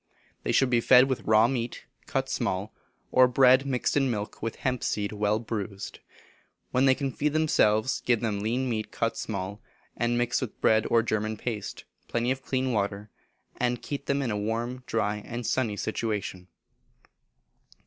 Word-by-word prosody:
They - - -1
should 135 -2 +3
be 120 -1 +3
fed 125 +2 +7
with 130 -2 -1
raw 110 +1 +5
meat, 120 -2 -3 0.2
cut - - -1
small, 95 +3 -2 0.4
or 130 0 +6
bread 130 +2 +5
mixed 125 -3 0
in 135 -2 +3
milk 105 -3 -4
with 115 0 -3
hemp 125 -2 -2
seed 105 -1 -1
well 105 0 +1
bruised; 105 -3 -5 0.7
when 130 +2 +3
they 130 - +5
can 135 -1 -2
feed 150 +3 -1
themselves 130 -7 +2
give 120 -2 +2
them 105 -3 -1
lean 120 +5 -1
meat 110 -3 -3
cut 115 0 -1
small, 100 0 -4 0.3
and 120 0 0
mixed 120 0 +1
with 125 -5 -5
bread 110 0 +3
or 115 -1 +4
German 110 -1 -1
paste, 110 -3 -5 0.2
plenty 120 +2 0
of 130 0 -2
clean 130 0 -1
water, 100 0 -2 0.5
and 125 -1 -1
keep 140 -1 -5
them 140 0 +1
in 120 - -1
a 105 - -1
warm, 115 +4 -2
dry, 105 -2 0
and 120 +3 -6
sunny 115 -5 0
situation. 105 -5 -3
115 Hz, 170 wpm, -27 LUFS, 105-130 Hz, 0.7 s, fed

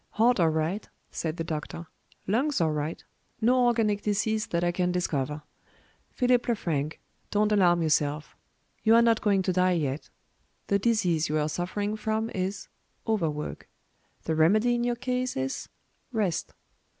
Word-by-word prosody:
"HEART 235 +1 +3
all 165 -2 +4
right," 160 +6 -2 0.2
said 160 0 -3
the 165 - -2
doctor. 160 +1 -5 0.4
"Lungs 255 +7 +1
all 160 -2 +2
right. 150 +1 -3 0.4
No 245 +2 +4
organic 215 -3 +1
disease 215 +1 0
that 170 0 -1
I 175 - +2
can 180 0 0
discover. 150 -4 -2 0.7
Philip 250 -1 +2
Lefrank, 160 - -1 0.3
don't 210 0 +2
alarm 175 -4 +4
yourself. 150 -1 0 0.5
You 225 0 +5
are 235 - +6
not 230 -1 +3
going 200 -3 +2
to 185 - 0
die 185 0 +3
yet. 145 -4 -2 0.6
The 200 - +3
disease 185 -8 +1
you 155 - +1
are 150 0 +1
suffering 205 +6 -2
from 220 +1 -2
is 190 +1 -3 0.4
overwork. 165 -9 -2 0.5
The 160 - -1
remedy 210 +10 +4
in 240 0 0
your 240 0 0
case 250 - -2
is 130 0 -3 0.4
rest." 205 -8 -1
190 Hz, 150 wpm, -27 LUFS, 160-220 Hz, 0.7 s, are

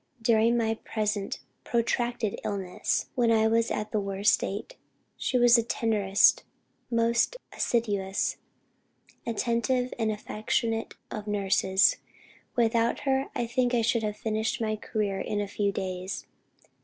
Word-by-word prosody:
"During 230 +1 +3
my 225 -1 0
present 210 -2 -2 0.2
protracted 235 -2 -1
illness, 190 -3 -1
and - - -32
when 235 -2 +3
I 220 -1 +4
was 230 +1 +2
at 210 0 -3
the 215 - +1
worst 200 +1 +2
stage, 200 +3 -2 0.4
she 255 - 0
was 240 -1 +7
the - - +4
tenderest, 210 -3 +3 0.5
most 235 - +2 0.2
assiduous, 205 -5 0 0.9
attentive 240 +2 0
and 220 -1 +1
affectionate 225 +2 -2 0.2
of 215 -1 -6
nurses. 195 -2 +3 0.6
Without 230 0 +2
her, 270 0 +1
I 240 - 0
think 245 +1 +1
I 230 - +2
should 230 +1 +2
have 210 -1 -3
finished 220 0 -1
my 215 -1 0
career 210 -2 -2
in 210 - -2
a 205 - -1
few 200 0 0
days. 185 0 -4
220 Hz, 135 wpm, -28 LUFS, 205-235 Hz, 0.9 s, was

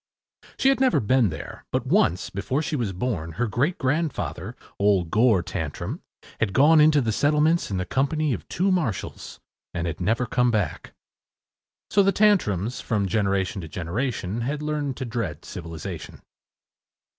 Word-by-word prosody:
She 265 - +4
had 270 - +2
never 260 -1 +3
been 120 0 +3
there; 80 - -8
but - - -1
once, 90 +2 +2
before 130 +10 -1
she 160 -1 -2
was 120 -8 -1
born, 90 -5 -3
her 120 - 0
great 135 - 0
grandfather, 150 +3 -2 0.2
old 100 -5 +2
Gore 110 -5 +4
Tantrum, 80 -4 -4 0.4
had 100 -3 0
gone 150 +6 +6
into 150 -1 +5
the 115 -3 0
settlements 150 +7 +2
in 100 - -2
the 90 - -2
company 145 +2 0
of - - -6
two 190 +3 +1
marshals, 155 - -3 0.4
and 85 - -1
had 85 0 -4
never 115 +7 +1
come 125 +2 +2
back. 105 -8 -2 1.0
So 205 - +5
the 195 0 +4
Tantrums, 125 - +2
from 105 -3 0
generation 95 0 0
to 80 - -7
generation, 100 - -3
had 145 +5 -2
learned 150 -3 -2
to 130 - -4
dread 110 -10 -4
civilization. 85 -1 -7
115 Hz, 155 wpm, -25 LUFS, 95-150 Hz, 1.0 s, gone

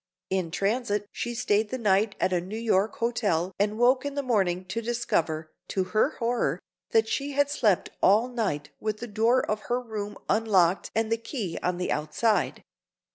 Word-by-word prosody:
In 185 -3 0
transit 205 +3 0
she 240 0 -4
stayed 215 -2 +1
the 260 - -3
night 205 -2 +2
at 185 - +1
a 175 - +1
New 195 +5 -6
York 220 -2 +1
hotel 200 -7 0
and 210 +1 +1
woke 255 +2 +4
in 285 0 -4
the 285 - -1
morning 190 -7 +1
to 210 +5 -3
discover, 165 -10 -1 0.2
to 190 - 0
her 220 +8 +2
horror, 230 - 0 0.3
that 225 0 +3
she 280 +4 -2
had 285 +1 +2
slept 215 -10 +2
all 215 +5 +5
night 195 - -2
with 215 -1 -2
the 235 - -6
door 230 +3 +2
of 215 - -1
her 245 +1 +2
room 210 -4 -5
unlocked 195 -5 +2
and 225 0 0
the 230 - +3
key 225 - -4
on 180 0 0
the 180 - -2
outside. 205 +9 0
215 Hz, 185 wpm, -27 LUFS, 190-235 Hz, 0.3 s, all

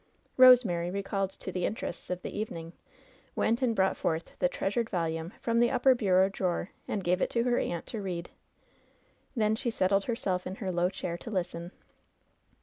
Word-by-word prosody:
Eosemary, 230 -10 +6
recalled 195 0 -1
to 190 - -8
the 180 -1 -3
interests 190 -4 -4
of 180 0 -3
the - - -6
evening, 170 -6 -5 0.6
went 230 +3 +1
and 240 -3 +2
brought 190 -1 +2
forth 160 0 -2
the 180 - +3
"treasured 220 +5 -1
volume^^ 165 -2 -2
from 230 0 +1
the 240 0 +4
upper 260 +1 +4
bureau 190 -5 +3
drawer 185 -1 -2 0.2
and 200 - -2
gave 180 +1 +1
it - - +1
to 235 - +1
her 245 0 +2
aunt 170 -1 -3
to 220 - -5
read. 175 -3 -4 1.0
Then 215 -2 +2
she 240 +2 -2
settled 195 -2 +1
herself 195 -7 -1
in 185 - -5
her 195 -2 -3
low 175 0 +1
chair 175 -3 -5
to 230 - -8
listen. 175 -3 -3
190 Hz, 180 wpm, -29 LUFS, 175-225 Hz, 1.0 s, Eosemary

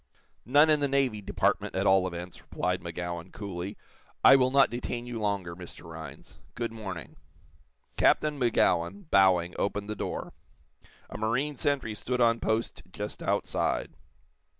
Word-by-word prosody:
"None 145 +5 +6
in 150 - +4
the 145 - +1
Navy 135 -6 +1
Department, 95 - 0
at 95 +1 0
all 95 -1 +4
events," 90 0 -7
replied 90 0 -2
Magowan, 85 0 -5
coolly. 100 -1 -6 0.5
"I 135 - +10
will 130 -1 +4
not 135 +1 +4
detain 120 0 -4
you 120 -2 -5
longer, 100 -5 -1
Mr. 90 -1 -11
Rhinds. 80 -4 -10 0.2
Good 120 -1 -3
morning." 95 -7 -7 0.8
Captain 150 -2 +3
Magowan, 125 - +1
bowing, 90 -2 +4
opened 100 +1 -2
the - - -3
door. - - -4 0.8
A - - -6
marine 125 +7 0
sentry 140 -5 0
stood 125 +4 -3
on 115 -1 +4
post 110 +1 -1
just 105 +2 -6
outside. - - -1
105 Hz, 145 wpm, -28 LUFS, 90-125 Hz, 0.8 s, I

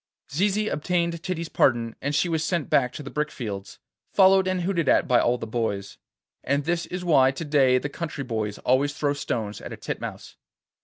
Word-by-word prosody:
Zizi 205 +6 +1
obtained 170 0 -1
Titty's 170 -2 -3
pardon, 115 -6 +1
and 145 +2 -1
she 175 - +2
was 160 -2 0
sent 165 -2 -1
back 125 -2 +3
to 150 - -7
the 135 - -8
brick 150 0 -1
fields, 100 -8 -6 0.3
followed 190 -1 +5
and 185 -1 0
hooted 170 -6 0
at - - +4
by 125 - +4
all 120 +1 +2
the - - -5
boys. 110 -4 -3 0.4
And 140 +1 0
this 175 0 -1
is 180 0 -5
why 135 -6 +5
to 135 +5 -5
day 135 -4 +4
the 130 - -2
country 155 -1 -5
boys 110 -4 -3
always 140 +3 +1
throw 145 -2 0
stones 110 -7 -3
at - - -8
a - - -8
titmouse. - - -6
145 Hz, 200 wpm, -25 LUFS, 125-170 Hz, 0.4 s, followed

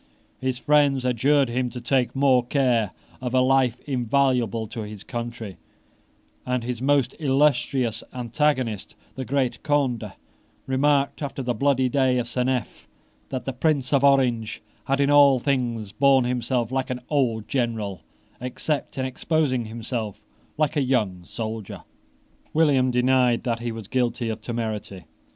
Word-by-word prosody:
His 130 -1 -1
friends 140 -2 +3
adjured 135 +3 +3
him 125 +1 -1
to 125 - -7
take 125 +1 0
more 135 -2 +4
care 120 -5 +1 0.3
of 125 0 -2
a - - +5
life 130 -2 +3
invaluable 125 -4 +1
to 115 +2 -6
his 105 -1 -8
country; 120 -5 -6 0.9
and 125 -1 -1
his 120 0 -4
most 135 -2 +2
illustrious 130 -5 +1
antagonist, 125 -3 -1 0.2
the 130 - -5
great 135 -2 -1
Conde, 130 -8 0 0.5
remarked, 140 +2 +1
after 140 -2 -4
the 125 0 0
bloody 130 +2 +2
day 130 -1 +2
of 120 -1 -1
Seneff 125 0 -2 0.4
that 130 - -4
the 135 - -3
Prince 140 0 0
of 140 -1 +3
Orange 125 -6 +2 0.2
had 135 +1 0
in 140 0 +3
all 140 -2 +7
things 120 -6 -1
borne 135 +2 +4
himself 125 -1 -1
like 130 0 -1
an 125 -1 -3
old 120 -7 0
general, 115 -7 -2 0.4
except 130 +5 -3
in 130 - -1
exposing 130 -2 0
himself 110 -2 -5 0.4
like 155 -2 +1
a 145 - +2
young 105 -9 0
soldier. 110 -1 -6 0.7
William 140 -5 +4
denied 125 -1 +2
that 115 -2 -1
he 120 0 -3
was 110 -3 -8
guilty 120 -2 -1
of 110 0 -4
temerity. 110 -5 -4
125 Hz, 145 wpm, -24 LUFS, 115-135 Hz, 0.9 s, all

